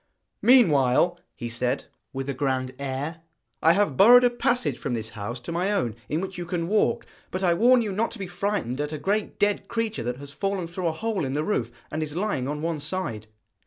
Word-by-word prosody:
'Meanwhile,' 175 Hz, -, +5 dB, 0.2 s
he 120 Hz, -, -5 dB
said, 125 Hz, +3 st, -1 dB, 0.3 s
with 135 Hz, 0 st, -4 dB
a 140 Hz, -, -1 dB
grand 130 Hz, -1 st, -1 dB
air, 140 Hz, +4 st, -4 dB, 0.4 s
'I 165 Hz, -, +6 dB
have 195 Hz, -8 st, +1 dB
burrowed 245 Hz, +5 st, +8 dB
a 245 Hz, -, +4 dB
passage 240 Hz, -, 0 dB
from 120 Hz, -, -2 dB
this 110 Hz, -1 st, -4 dB
house 110 Hz, +3 st, -6 dB
to 120 Hz, -, -6 dB
my 180 Hz, +4 st, 0 dB
own, 125 Hz, -, 0 dB
in 155 Hz, +3 st, 0 dB
which 190 Hz, -1 st, -5 dB
you 175 Hz, -, -4 dB
can 170 Hz, -1 st, -2 dB
walk; 210 Hz, +3 st, +1 dB, 0.2 s
but 185 Hz, +1 st, -3 dB
I 175 Hz, -2 st, +4 dB
warn 240 Hz, +6 st, +5 dB
you 210 Hz, -, -2 dB
not 215 Hz, +4 st, 0 dB
to -, -, -9 dB
be 195 Hz, -, -4 dB
frightened 180 Hz, -, -2 dB
at 150 Hz, 0 st, -3 dB
a 155 Hz, -, -3 dB
great 200 Hz, +7 st, -1 dB
dead 205 Hz, 0 st, +1 dB
creature 230 Hz, -2 st, -2 dB
that 125 Hz, +1 st, -3 dB
has 140 Hz, +1 st, -9 dB
fallen 195 Hz, +3 st, -2 dB
through 175 Hz, +1 st, -3 dB
a -, -, +2 dB
hole 220 Hz, +2 st, -2 dB
in 135 Hz, 0 st, -2 dB
the 150 Hz, -, 0 dB
roof, 125 Hz, -, -1 dB, 0.2 s
and 155 Hz, -, -2 dB
is 150 Hz, -1 st, -4 dB
lying 180 Hz, -9 st, -1 dB
on 150 Hz, +2 st, -3 dB
one 165 Hz, -2 st, -1 dB
side.' 145 Hz, -, -3 dB
165 Hz, 225 wpm, -25 LUFS, 135-200 Hz, 0.4 s, burrowed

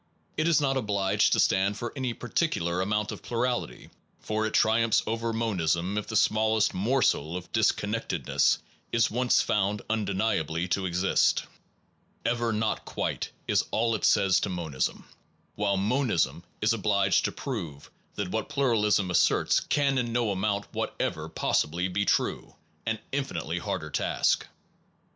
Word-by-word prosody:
It 155 Hz, -, +1 dB
is 165 Hz, -3 st, +4 dB
not 135 Hz, -2 st, +1 dB
obliged 100 Hz, -5 st, +1 dB
to -, -, +2 dB
stand 100 Hz, +2 st, +2 dB
for 120 Hz, -, -5 dB
any 130 Hz, -3 st, -2 dB
particu 155 Hz, -, -1 dB
lar 85 Hz, +2 st, 0 dB
amount 105 Hz, +2 st, -1 dB
of -, -, -8 dB
plurality, 120 Hz, +1 st, -3 dB, 0.3 s
for 110 Hz, 0 st, -1 dB
it 110 Hz, -, -4 dB
triumphs 110 Hz, 0 st, +3 dB
over 115 Hz, +1 st, -2 dB
monism 95 Hz, -5 st, 0 dB
if 105 Hz, -, -2 dB
the 110 Hz, -, -5 dB
smallest 110 Hz, +1 st, +3 dB
morsel 95 Hz, -, +1 dB
of 90 Hz, -, -10 dB
disconnected -, -, 0 dB
ness -, -, +3 dB, 0.3 s
is 115 Hz, -2 st, +2 dB
once 125 Hz, +2 st, +3 dB
found 105 Hz, 0 st, 0 dB
undeniably 95 Hz, -6 st, 0 dB
to 95 Hz, +1 st, 0 dB
exist. 90 Hz, +2 st, +2 dB, 0.8 s
Ever 120 Hz, 0 st, +1 dB
not 110 Hz, 0 st, -1 dB
quite -, -, -3 dB, 0.2 s
is -, -, +2 dB
all 115 Hz, +1 st, +1 dB
it 110 Hz, -, -3 dB
says 95 Hz, -2 st, +4 dB
to -, -, -2 dB
monism; 85 Hz, -7 st, -3 dB, 0.5 s
while 100 Hz, -1 st, 0 dB
mon 125 Hz, +7 st, +1 dB
ism 85 Hz, -3 st, 0 dB, 0.2 s
is 105 Hz, +2 st, +3 dB
obliged 100 Hz, -3 st, +2 dB
to -, -, 0 dB
prove 85 Hz, -, -6 dB, 0.2 s
that 90 Hz, -, -3 dB
what 110 Hz, +4 st, -2 dB
pluralism 110 Hz, -9 st, +2 dB
asserts -, -, +3 dB
can 140 Hz, -2 st, +1 dB
in 120 Hz, -2 st, -2 dB
no 120 Hz, -2 st, +1 dB
amount 100 Hz, +1 st, -1 dB
whatever -, -, -3 dB
possibly 85 Hz, +4 st, 0 dB
be 100 Hz, +2 st, -1 dB
true -, -, 0 dB, 0.3 s
an -, -, 0 dB
infinitely -, -, -2 dB
harder -, -, -4 dB
task. -, -, +1 dB
105 Hz, 150 wpm, -27 LUFS, 95-115 Hz, 0.8 s, is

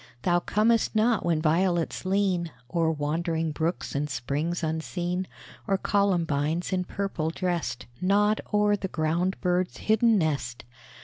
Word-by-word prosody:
Thou 175 Hz, +3 st, +3 dB
comest 220 Hz, +5 st, +2 dB
not 220 Hz, 0 st, +3 dB
when 165 Hz, -2 st, +1 dB
violets 170 Hz, +2 st, +1 dB
lean 190 Hz, -3 st, +1 dB, 0.2 s
O'er 165 Hz, -2 st, +2 dB
wandering 160 Hz, +1 st, -1 dB
brooks 165 Hz, +3 st, -2 dB
and 145 Hz, +1 st, -1 dB
springs 145 Hz, +7 st, -2 dB
unseen, 175 Hz, +3 st, -2 dB, 0.4 s
Or 195 Hz, -2 st, +2 dB
columbines, 175 Hz, -5 st, 0 dB
in 180 Hz, -1 st, 0 dB
purple 185 Hz, -5 st, -2 dB
dressed, 170 Hz, -7 st, -2 dB, 0.2 s
Nod 205 Hz, +3 st, +3 dB
o'er 210 Hz, 0 st, +3 dB
the 195 Hz, -1 st, -4 dB
ground 170 Hz, +3 st, -1 dB
bird's 180 Hz, 0 st, 0 dB
hidden 220 Hz, +1 st, +3 dB
nest. 140 Hz, -8 st, -2 dB
175 Hz, 130 wpm, -27 LUFS, 160-195 Hz, 0.4 s, Thou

